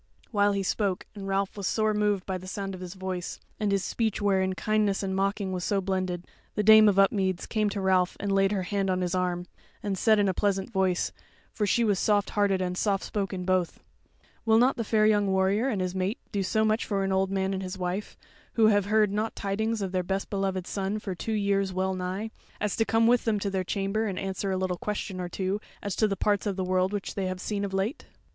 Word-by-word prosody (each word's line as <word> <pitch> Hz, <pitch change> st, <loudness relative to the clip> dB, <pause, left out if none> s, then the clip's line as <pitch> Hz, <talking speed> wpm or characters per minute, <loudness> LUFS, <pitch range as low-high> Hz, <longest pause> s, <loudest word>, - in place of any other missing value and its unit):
While 205 Hz, -2 st, +3 dB
he 200 Hz, 0 st, -1 dB
spoke, 195 Hz, -1 st, -1 dB
and 200 Hz, -2 st, -7 dB
Ralph 195 Hz, 0 st, 0 dB
was 200 Hz, -2 st, -3 dB
sore 215 Hz, -1 st, +1 dB
moved 210 Hz, -2 st, +1 dB
by 190 Hz, -1 st, -3 dB
the 185 Hz, -, -10 dB
sound 195 Hz, 0 st, -4 dB
of 185 Hz, -, -8 dB
his 180 Hz, +1 st, -7 dB
voice, 185 Hz, -1 st, -4 dB, 0.2 s
and 210 Hz, -2 st, 0 dB
his 195 Hz, -1 st, +1 dB
speech 225 Hz, -3 st, -1 dB
wherein 190 Hz, -2 st, +1 dB
kindness 210 Hz, -1 st, +1 dB
and 190 Hz, -1 st, -2 dB
mocking 195 Hz, 0 st, 0 dB
was 180 Hz, -1 st, -3 dB
so 200 Hz, +1 st, +1 dB
blended, 185 Hz, -2 st, -2 dB, 0.3 s
the 210 Hz, -, +1 dB
Dame 215 Hz, 0 st, +8 dB
of 195 Hz, -, +1 dB
Upmeads 195 Hz, -2 st, +2 dB
came 215 Hz, -2 st, 0 dB
to 200 Hz, 0 st, -3 dB
Ralph 185 Hz, -1 st, +2 dB
and 200 Hz, 0 st, -2 dB
laid 195 Hz, 0 st, +3 dB
her 195 Hz, -3 st, 0 dB
hand 195 Hz, +1 st, -1 dB
on 185 Hz, 0 st, +1 dB
his 180 Hz, 0 st, -1 dB
arm, 180 Hz, -1 st, -1 dB, 0.4 s
and 200 Hz, -2 st, -1 dB
said 215 Hz, +3 st, +4 dB
in 205 Hz, -1 st, +3 dB
a 190 Hz, -, +1 dB
pleasant 195 Hz, +3 st, 0 dB
voice, 190 Hz, -3 st, +1 dB, 0.4 s
for 210 Hz, -, 0 dB
she 235 Hz, -, +3 dB
was 205 Hz, -4 st, +2 dB
soft 205 Hz, -1 st, +2 dB
hearted 200 Hz, -2 st, +2 dB
and 180 Hz, 0 st, -2 dB
soft 195 Hz, 0 st, 0 dB
spoken 195 Hz, -3 st, -3 dB
both: 185 Hz, -2 st, 0 dB, 0.6 s
"Will 220 Hz, -1 st, +4 dB
not 250 Hz, +3 st, +4 dB
the 230 Hz, -, -2 dB
fair 215 Hz, 0 st, +2 dB
young 205 Hz, -2 st, +3 dB
warrior 190 Hz, +5 st, +2 dB
and 205 Hz, -7 st, -1 dB
his 180 Hz, -1 st, -2 dB
mate 190 Hz, +4 st, -1 dB
do 200 Hz, -, -1 dB
so 220 Hz, +3 st, +1 dB
much 215 Hz, +1 st, +2 dB
for 200 Hz, -2 st, -1 dB
an 195 Hz, -, -1 dB
old 190 Hz, 0 st, +2 dB
man 190 Hz, 0 st, 0 dB
and 190 Hz, -, -2 dB
his 185 Hz, 0 st, -5 dB
wife, 180 Hz, +3 st, -3 dB, 0.4 s
who 225 Hz, -, +4 dB
have 205 Hz, -2 st, +3 dB
heard 210 Hz, 0 st, +3 dB
not 215 Hz, +2 st, -1 dB
tidings 220 Hz, +2 st, -1 dB
of 190 Hz, -, -3 dB
their 185 Hz, -1 st, +1 dB
best 195 Hz, +2 st, -3 dB
beloved 195 Hz, -2 st, -1 dB
son 195 Hz, +2 st, -2 dB
for 205 Hz, -3 st, -4 dB
two 220 Hz, +5 st, -4 dB
years 200 Hz, -2 st, +1 dB
well 190 Hz, +1 st, 0 dB
nigh, 185 Hz, +4 st, -3 dB, 0.3 s
as 210 Hz, -2 st, -1 dB
to 225 Hz, -, +2 dB
come 225 Hz, 0 st, +3 dB
with 240 Hz, +1 st, +4 dB
them 215 Hz, -3 st, +1 dB
to 200 Hz, 0 st, -2 dB
their 190 Hz, -1 st, 0 dB
chamber, 200 Hz, +4 st, -1 dB
and 190 Hz, -3 st, -3 dB
answer 195 Hz, +1 st, -3 dB
a 190 Hz, -, 0 dB
little 185 Hz, -1 st, -1 dB
question 195 Hz, -1 st, -4 dB
or 175 Hz, -, -4 dB
two 190 Hz, +3 st, -2 dB, 0.2 s
as 200 Hz, -2 st, -2 dB
to 215 Hz, -, +3 dB
the 195 Hz, -1 st, -2 dB
parts 205 Hz, 0 st, +1 dB
of 200 Hz, -, -1 dB
the 190 Hz, -, -2 dB
world 185 Hz, +1 st, +1 dB, 0.2 s
they 195 Hz, -2 st, -1 dB
have 185 Hz, 0 st, -4 dB
seen 205 Hz, +1 st, -2 dB
of 200 Hz, -, -3 dB
late?" 195 Hz, +9 st, -2 dB
195 Hz, 240 wpm, -27 LUFS, 185-210 Hz, 0.6 s, Dame